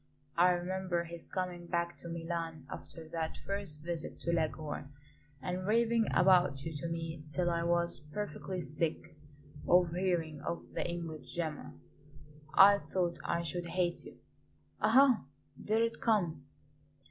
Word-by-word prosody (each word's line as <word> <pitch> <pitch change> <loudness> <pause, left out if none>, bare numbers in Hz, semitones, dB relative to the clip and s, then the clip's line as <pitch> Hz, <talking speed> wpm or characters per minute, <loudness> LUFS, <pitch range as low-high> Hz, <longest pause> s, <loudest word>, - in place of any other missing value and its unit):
I 175 +2 +6
remember 180 0 -1
his 170 0 -9
coming 180 -2 -3
back 170 0 -1
to 170 - -7
Milan 165 -3 -4
after 160 -1 -8
that 160 -1 -3
first 195 -7 -3
visit 170 -1 -3
to 170 - 0
Leghorn 155 -3 -2 0.5
and 185 +1 -2
raving 230 +1 +3
about 180 -7 +4
you 160 - -4
to 170 - -3
me 165 -2 -4
till 175 +4 +1
I 170 0 0
was 170 0 +2
perfectly 190 -2 -4
sick 155 +3 -3 0.5
of 175 -1 +5
hearing 170 -5 0
of 170 - -3
the - - -1
English 165 -3 -6
Gemma. 160 -3 -3 0.8
I 200 +3 +8
thought 175 -3 -1
I 170 0 0
should 175 +1 -3
hate 175 -1 0
you. - - -12 0.6
Ah! 255 - +6 0.3
there 220 +9 +1
it 230 0 -2
comes!" 165 - +1
170 Hz, 140 wpm, -33 LUFS, 165-185 Hz, 0.8 s, I